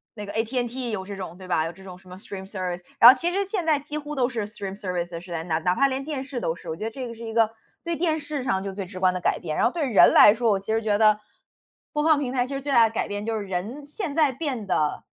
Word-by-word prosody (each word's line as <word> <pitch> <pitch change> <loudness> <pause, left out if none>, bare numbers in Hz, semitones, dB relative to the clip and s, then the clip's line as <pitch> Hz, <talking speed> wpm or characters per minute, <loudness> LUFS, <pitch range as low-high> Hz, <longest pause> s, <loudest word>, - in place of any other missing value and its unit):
那 210 -1 -6
个 200 - -7
At&T 240 +2 -1
也 - - -2
有 190 -3 -3
这 200 0 -6
种 180 -2 -7
对 185 -1 -11
吧？ 160 -3 +1
有 165 - -4
这 190 +3 -16
种 180 -2 -10
什 185 - -18
么 180 - -9
Streamservice， 190 -2 -6 0.2
然 235 - +11
后 260 - +8
其 345 +5 -1
实 395 +2 0
现 375 -4 -3
在 310 -2 +3
几 295 +1 -6
乎 295 0 -7
都 250 -2 +2
是 225 -5 -3
Streamservice 185 -5 -5
是 175 -1 -12
在 165 -1 -3
那， 160 -2 0
哪 180 +2 +1
怕 275 - +4
连 270 0 -3
电 285 -3 -4
视 265 -3 -5
都 165 - -1
是， 175 - -14
我 160 - -3
觉 210 - -7
得 225 - -1
这 255 -1 -6
个 230 - -7
是 230 - -10
一 225 - -6
个 225 -1 +3 0.3
对 340 0 -2
电 320 -2 0
视 290 -2 -4
上 195 -7 0
就 195 -1 -5
最 195 -1 -5
直 185 -1 -9
观 185 -1 +3
的 180 - -3
改 - - +1
变。 155 -3 -4
然 - - +2
后 240 - +3
对 325 -4 -1
人 220 - +6
来 205 - +9
说， 230 0 0
我 195 - +2
其 220 +3 -3
实 225 - +1
觉 210 -2 +1
得， 215 -1 +4 0.7
播 295 0 0
放 315 -2 +5
平 260 -2 -3
台 250 -1 +1
其 275 - -5
实 275 - -3
最 285 0 -3
大 230 -3 +6
的 - - -15
改 - - -1
变， 205 0 -4
就 225 -1 -1
是 205 - -4
人 205 +10 -4
现 300 0 -5
在 300 -4 +4
变 260 -8 -4
得 155 -4 0
220 Hz, 435 characters per minute, -25 LUFS, 190-275 Hz, 0.7 s, 然